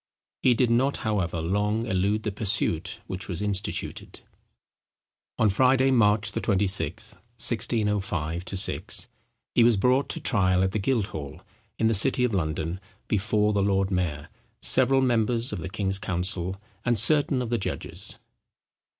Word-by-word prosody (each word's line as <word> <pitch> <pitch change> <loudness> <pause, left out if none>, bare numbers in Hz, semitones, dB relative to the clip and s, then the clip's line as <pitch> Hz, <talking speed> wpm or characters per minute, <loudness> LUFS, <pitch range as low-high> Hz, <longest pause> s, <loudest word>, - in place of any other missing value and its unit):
He 125 -2 +4
did 120 -1 +2
not, 130 +4 +2
however, 95 -6 -1
long 105 +6 0
elude 105 0 0
the 105 - -2
pursuit 95 -4 -1
which 95 -1 -6
was 90 +2 -2
instituted. 100 -1 -3 1.2
On 110 - +3
Friday, 130 +5 +3
March 105 -3 +3
26, 100 0 -1
1605 105 -6 -1
6, 95 -2 0 0.5
he 120 - +5
was 115 -2 +4
brought 125 +7 +2
to - - -1
trial 95 -5 +2
at 95 - +1
the 110 - -1
Guildhall, 95 - -2 0.4
in 115 - 0
the 115 - +3
city 125 +5 +2
of 125 -3 +1
London, 80 0 -2 0.3
before 105 +1 +1
the 100 - +1
lord 95 0 +1
mayor, 80 -4 -2 0.3
several 135 +1 +3
members 120 -1 +1
of - - -3
the 90 - -5
king's 95 0 -1
council, 90 0 -2 0.2
and 120 -1 +1
certain 140 +3 +4
of 120 -2 -3
the 120 - +1
judges. - - -4
105 Hz, 140 wpm, -26 LUFS, 95-115 Hz, 1.2 s, he